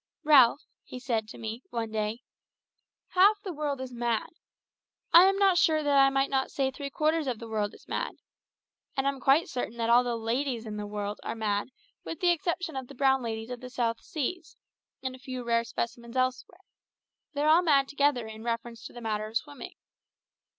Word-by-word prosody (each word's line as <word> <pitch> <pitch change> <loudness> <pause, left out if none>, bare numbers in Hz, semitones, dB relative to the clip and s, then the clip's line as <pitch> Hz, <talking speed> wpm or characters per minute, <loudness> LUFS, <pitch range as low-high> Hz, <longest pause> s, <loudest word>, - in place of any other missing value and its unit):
"Ralph," 285 -3 +6 0.2
he - - -9
said 230 -4 -1
to - - -10
me 225 +1 -5
one 230 -2 -3
day, 215 +1 -2 0.9
"half 400 +3 +5
the 375 - -4
world 290 -3 -2
is 260 -1 -6
mad 235 -2 -1 0.8
I 345 +2 +10
am 390 +1 +3
not 390 -3 +4
sure 310 -1 +3
that 290 -1 +2
I 275 0 +7
might 270 0 0
not 265 -1 +1
say 265 -1 -1
three 280 +1 -6
quarters 310 +1 0
of 250 -3 -1
the 230 - -9
world 215 -1 -2
is - - -19
mad - - -2 0.8
and 270 +1 +1
I'm 275 -1 -1
quite 275 +6 +4
certain 240 -2 -4
that 230 0 +1
all 240 +1 +6
the 240 -1 -1
ladies 235 +1 -2
in 210 -1 -5
the 210 0 -4
world 205 0 -4
are - - -4
mad 205 -2 -1 0.4
with 325 - -6
the 355 -1 +4
exception 345 -1 -2
of 260 -1 -5
the 280 - -12
brown 265 0 +3
ladies 225 0 -4
of 250 - -5
the 255 - -8
South 235 -3 -1
Seas, 320 +3 -4 0.5
and 260 -1 -3
a - - -15
few 255 -1 -6
rare 230 -1 +2
specimens 235 +1 -5
elsewhere; 255 +8 -1 0.7
they're 290 +1 +1
all 325 +3 +6
mad 280 -6 +3
together 285 -4 +1
in 220 0 -9
reference 230 -1 -4
to - - -16
the 240 - -9
matter 215 -1 -2
of 220 +1 0
swimming. 285 -1 -8
255 Hz, 200 wpm, -28 LUFS, 230-285 Hz, 0.9 s, I